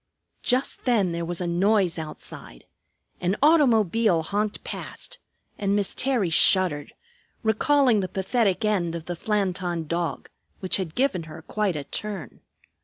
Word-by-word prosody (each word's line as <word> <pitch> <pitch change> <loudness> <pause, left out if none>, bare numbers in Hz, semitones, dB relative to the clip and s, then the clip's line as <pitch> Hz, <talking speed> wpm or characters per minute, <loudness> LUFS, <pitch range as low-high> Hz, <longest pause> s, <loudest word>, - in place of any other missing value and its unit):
Just 255 +2 0
then 215 -8 +2
there 170 0 -3
was 175 +1 -3
a - - -1
noise 180 0 +2
outside. 155 - -8 0.5
An 180 +2 0
automobile 225 - +4
honked 205 +4 -2
past, - - -6 0.4
and 200 0 +1
Miss 205 -2 +1
Terry 245 -10 +1
shuddered, 160 -3 +3 0.5
recalling 245 +2 +3
the 190 - -1
pathetic 195 +2 0
end 180 -6 0
of 165 -1 -6
the 175 - -4
Flanton 180 -4 -1
Dog, 170 +1 -2 0.3
which 185 -3 +1
had 180 -5 -5
given 245 -11 0
her 155 +1 -10
quite 205 -1 -1
a 145 - -3
turn. 200 +3 -5
190 Hz, 140 wpm, -25 LUFS, 170-220 Hz, 0.5 s, automobile